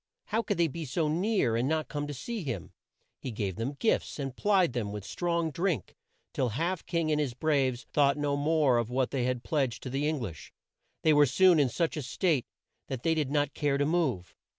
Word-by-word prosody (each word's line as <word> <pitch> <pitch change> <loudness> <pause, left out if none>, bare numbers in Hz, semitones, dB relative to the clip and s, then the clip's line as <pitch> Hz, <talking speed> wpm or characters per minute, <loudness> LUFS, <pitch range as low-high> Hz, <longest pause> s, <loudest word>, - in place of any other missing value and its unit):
How 220 +2 0
could 215 - -2
they 170 -1 +3
be 160 +3 -5
so 155 +3 -1
near 170 - +1
and 120 +4 +1
not 155 0 0
come 145 0 -3
to 145 - -4
see 230 - -4
him? 115 - -4 0.5
He - - -5
gave 105 -5 -3
them 125 +6 -3
gifts 225 - 0
and 135 -3 -4
plied 190 -7 +3
them 110 -5 -2
with 105 -1 -6
strong 170 - -1
drink, 170 - -2 0.4
till 130 - 0
Half 165 - -2
King 165 -2 0
and 150 0 +2
his 130 -5 -2
braves 135 -4 +1
thought 140 -1 +4
no 145 -1 0
more 145 -4 +3
of 120 -1 -2
what 130 0 0
they 130 -3 0
had 125 -1 -1
pledged 135 -6 -1
to 130 - -5
the 140 +3 0
Eng 155 -1 0
lish. 85 -10 -7 0.5
They 155 - +5
were 145 -1 +6
soon 175 +5 +5
in 140 -3 +3
such 165 +4 -1
a - - -1
state 145 +1 0 0.4
that 130 -3 -5
they 165 - +3
did 155 -4 0
not 145 0 0
care 145 -2 0
to 145 - +1
move. 145 - 0
145 Hz, 220 wpm, -29 LUFS, 125-165 Hz, 0.5 s, were